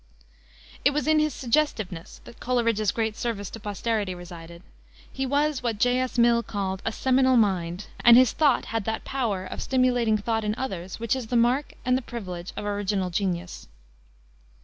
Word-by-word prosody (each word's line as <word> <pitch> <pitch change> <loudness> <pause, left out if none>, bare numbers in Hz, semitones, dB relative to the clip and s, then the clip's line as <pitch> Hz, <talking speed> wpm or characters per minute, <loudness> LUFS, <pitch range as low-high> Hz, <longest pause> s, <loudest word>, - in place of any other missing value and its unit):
It 285 - +4
was 300 - 0
in 310 0 +4
his 305 0 +2
suggestiveness 225 - -2
that - - -14
Coleridge's 230 -4 +1
great 220 -2 -2
service 215 -5 -3
to 225 - -8
posterity 205 -1 -2
resided. 170 -1 -11 0.5
He 270 0 -2
was 290 +1 +1
what 235 -3 -1
J. 245 +4 +2
S. 255 0 -2
Mill 235 0 +4
called 195 -4 -3
a 225 - -1
"seminal 260 +2 +3
mind," 185 -4 0 0.2
and 240 0 +9
his 255 -2 +6
thought 290 -5 +2
had 225 -3 -1
that 220 0 -3
power 225 -9 -2
of 185 - -6
stimulating 245 -4 +2
thought 225 +1 -1
in 210 0 -1
others, 190 -8 -5
which 230 +2 0
is 255 -4 -5
the 245 - -2
mark 245 +5 +1
and 250 0 +3
the 260 - 0
privilege 185 -8 -7
of - - -4
original 200 -2 -1
genius. 180 -1 -3
225 Hz, 175 wpm, -26 LUFS, 195-255 Hz, 0.5 s, and